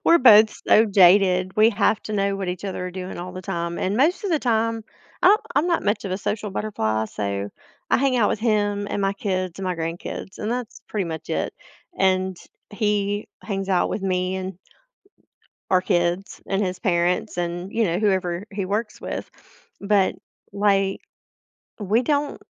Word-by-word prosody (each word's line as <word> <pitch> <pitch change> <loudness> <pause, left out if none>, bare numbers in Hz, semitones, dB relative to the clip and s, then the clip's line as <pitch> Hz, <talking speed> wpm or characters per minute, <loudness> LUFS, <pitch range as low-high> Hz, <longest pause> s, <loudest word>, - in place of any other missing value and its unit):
we're 335 - +6
both 220 -3 +8 0.2
so 220 +1 +6
jaded, 185 -1 +4
we 220 +2 +6
have 215 0 +1
to 215 - -5
know 200 -1 0
what 190 -2 -4
each 180 +2 -4
other 185 -2 -3
are - - -5
doing 185 0 -6
all 180 +1 -6
the 185 0 -7
time, 170 -2 -3
and 195 +3 -1
most 335 - +2
of 390 - -1
the 315 - +3
time, 230 -3 0 0.4
I'm 400 +4 +7 0.2
I'm 300 - +3
not 340 -2 +1
much 205 +1 0
of 195 - -4
a 185 - -2
social 210 +1 -3
butterfly, 110 - -1
so 100 -1 -3 0.4
I - - +5
hang 265 -1 +2
out 225 -4 +3
with - - -1
him 205 -3 +1
and - - -2
my 195 0 +1
kids 185 -3 -3
and 195 - -4
my 180 -1 -1
grandkids, 165 +3 -5
and 210 - -3
that's 245 -1 -4
pretty 205 -3 -1
much 160 -2 -6
it, - - -1 0.5
and 185 -1 +2 0.3
he 205 -1 -1
hangs 195 -2 -3
out 185 -2 +2
with 200 - -3
me 185 0 0
and 190 -1 -5 1.1
our 185 -1 +4
kids 175 +1 -1
and 195 +1 0
his 185 -1 -3
parents 175 0 0
and, 175 +2 -3
you 230 -1 +2
know, 175 -1 0
whoever 185 -3 0
he 195 -1 -3
works 210 +3 -3
with. - - -5 0.5
But, 200 -1 +2 0.4
like, 195 -1 +1 0.8
we 215 +4 +1
don't 290 +2 -1
195 Hz, 185 wpm, -23 LUFS, 180-215 Hz, 1.1 s, both